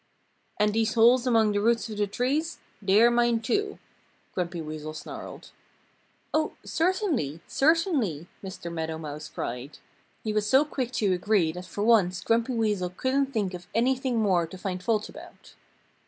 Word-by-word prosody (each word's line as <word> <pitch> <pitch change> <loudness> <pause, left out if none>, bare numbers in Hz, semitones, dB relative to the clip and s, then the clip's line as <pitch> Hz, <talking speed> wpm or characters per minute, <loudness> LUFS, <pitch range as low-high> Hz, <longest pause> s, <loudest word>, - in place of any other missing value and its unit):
"And 210 0 +3
these 225 +1 +1
holes 240 +2 +5
among 225 -3 +4
the 205 0 0
roots 230 +1 +2
of 215 -2 -7
the 205 - +2
trees 275 +10 -1 0.2
they 200 +2 +4
are 240 - +6
mine 240 -1 +3
too," 410 - -1 0.6
Grumpy 180 -1 -3
Weasel 155 -1 -6
snarled. 150 - -9 0.8
"Oh, 310 0 +1
certainly! 325 - 0
Certainly!" 280 - +1 0.2
Mr. 185 -3 -7
Meadow 160 -1 -3
Mouse 150 -1 -7
cried. 125 +4 -5 0.5
He 215 - -2
was 210 0 0
so 270 +3 +5
quick 260 -5 -3
to 200 -6 +2
agree 180 -2 +2
that 180 +2 -8
for 205 - -3
once 200 -6 +3
Grumpy 230 +2 +1
Weasel 210 -5 0
couldn't 265 +9 0
think 215 -8 -2
of 175 0 -8
anything 255 +1 +1
more 185 -6 +2
to 185 - -10
find 185 -1 -4
fault 215 +1 0
about. - - -13
215 Hz, 160 wpm, -27 LUFS, 180-250 Hz, 0.8 s, are